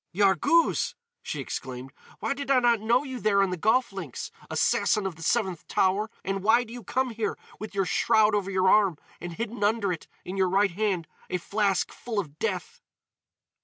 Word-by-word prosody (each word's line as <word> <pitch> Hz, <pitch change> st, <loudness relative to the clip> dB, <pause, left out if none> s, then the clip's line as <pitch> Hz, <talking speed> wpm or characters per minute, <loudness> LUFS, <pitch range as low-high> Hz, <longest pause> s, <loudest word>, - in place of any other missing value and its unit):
"Yarghouz!" 200 Hz, -, +3 dB, 0.3 s
she -, -, -5 dB
exclaimed. 130 Hz, +1 st, -6 dB, 0.3 s
"Why -, -, 0 dB
did 280 Hz, 0 st, -6 dB
I 270 Hz, -2 st, +5 dB
not 240 Hz, -2 st, +3 dB
know 235 Hz, +4 st, +3 dB
you 260 Hz, -3 st, -6 dB
there 200 Hz, -3 st, +3 dB
on 190 Hz, -, 0 dB
the -, -, -1 dB
golf 220 Hz, +5 st, +2 dB
links, 175 Hz, -10 st, -6 dB, 0.2 s
Assassin 210 Hz, -, +2 dB
of 190 Hz, -3 st, -3 dB
the 165 Hz, -, -14 dB
Seventh 185 Hz, -2 st, 0 dB
Tower? 195 Hz, +3 st, +1 dB
And 195 Hz, 0 st, -2 dB
why 225 Hz, +5 st, +4 dB
do 230 Hz, -1 st, -11 dB
you 245 Hz, -1 st, -8 dB
come 255 Hz, +5 st, -1 dB
here 225 Hz, -1 st, -2 dB, 0.2 s
with 215 Hz, -1 st, -7 dB
your 195 Hz, -1 st, +1 dB
shroud 215 Hz, +2 st, +3 dB
over 200 Hz, -2 st, 0 dB
your 190 Hz, -1 st, +2 dB
arm 195 Hz, -5 st, +4 dB, 0.2 s
and 175 Hz, 0 st, -6 dB
hidden 220 Hz, +2 st, -4 dB
under 205 Hz, -2 st, +2 dB
it, 165 Hz, -, -8 dB, 0.2 s
in 185 Hz, +2 st, -5 dB
your 190 Hz, -1 st, +3 dB
right 195 Hz, +1 st, +3 dB
hand, 190 Hz, -3 st, -1 dB, 0.2 s
a 180 Hz, -, 0 dB
flask 200 Hz, +1 st, 0 dB
full 230 Hz, -3 st, -6 dB
of 155 Hz, -7 st, -3 dB
death?" -, -, -3 dB
205 Hz, 195 wpm, -27 LUFS, 185-230 Hz, 0.3 s, I